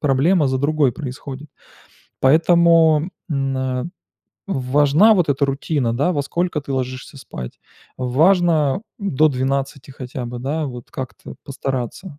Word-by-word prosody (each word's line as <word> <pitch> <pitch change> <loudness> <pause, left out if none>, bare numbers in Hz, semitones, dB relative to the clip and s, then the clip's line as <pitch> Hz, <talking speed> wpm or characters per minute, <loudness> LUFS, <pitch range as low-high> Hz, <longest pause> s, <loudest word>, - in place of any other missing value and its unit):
проблема 145 +3 +2
за 130 0 0
другой 145 -1 +2
происходит. 140 0 -8 0.7
Поэтому, 165 +2 +4 0.2
м, 135 -2 -1
а, 130 -1 -2 0.6
важна 145 - +3
вот 175 -6 +1
эта 140 +1 +1
рутина, 135 -3 -1
да: 145 +7 +1
во 145 - 0
сколько 170 +1 -2
ты 140 0 -6
ложишься 130 +2 -5
спать. 65 - -9 0.4
Важно, 155 +4 +2 0.2
м, 200 -6 -3
до 155 +1 +5
12 135 +1 -2
хотя 130 -1 -7
бы, 120 +1 -6
да, 145 +5 -2
вот 125 -2 -9
как-то 130 -5 -8
постараться. 135 - -5
140 Hz, 135 wpm, -20 LUFS, 130-160 Hz, 0.7 s, до